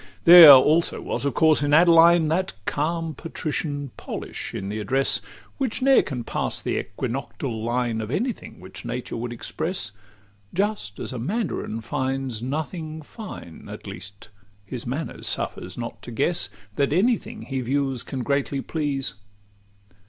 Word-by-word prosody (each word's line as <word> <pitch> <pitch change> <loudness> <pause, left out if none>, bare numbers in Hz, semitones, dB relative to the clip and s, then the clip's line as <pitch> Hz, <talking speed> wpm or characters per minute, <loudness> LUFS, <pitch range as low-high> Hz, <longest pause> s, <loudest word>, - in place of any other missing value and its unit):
XXXIV - - -23
There 170 -3 +12
also 150 +6 +4
was - - -3
of 140 - -1
course 160 -2 +4
in 145 0 +3
Adeline 170 0 +6
That 185 +4 0
calm 165 +2 -1
patrician 145 -3 -4
polish - - -6
in 95 - -5
the 105 +1 -3
address, 130 +6 +2 0.4
Which 260 -1 -1
ne'er 270 0 +6
can 125 -4 -5
pass - - -2
the - - -1
equinoctial 115 0 -4
line 120 -1 -1
Of 110 - -5
any 235 - 0
thing - - -13
which 95 +1 -9
nature 120 +1 -4
would 120 +1 -4
express; 155 - -4 0.6
Just 200 - -1
as - - -5
a 125 - -4
mandarin 170 - -2
finds 130 -1 -2
nothing 155 +4 -4
fine, 185 - -10
At - - -9
least 100 +3 -10 0.4
his 120 +4 -6
manner 140 +7 -4
suffers - - -3
not - - -6
to - - -9
guess - - +1 0.3
That 140 -1 +2
any 225 +7 +4
thing 220 +1 -10
he 135 -1 -3
views 135 0 -1
can 130 -2 -5
greatly 140 +1 0
please. 140 - -2
140 Hz, 155 wpm, -24 LUFS, 120-165 Hz, 0.6 s, There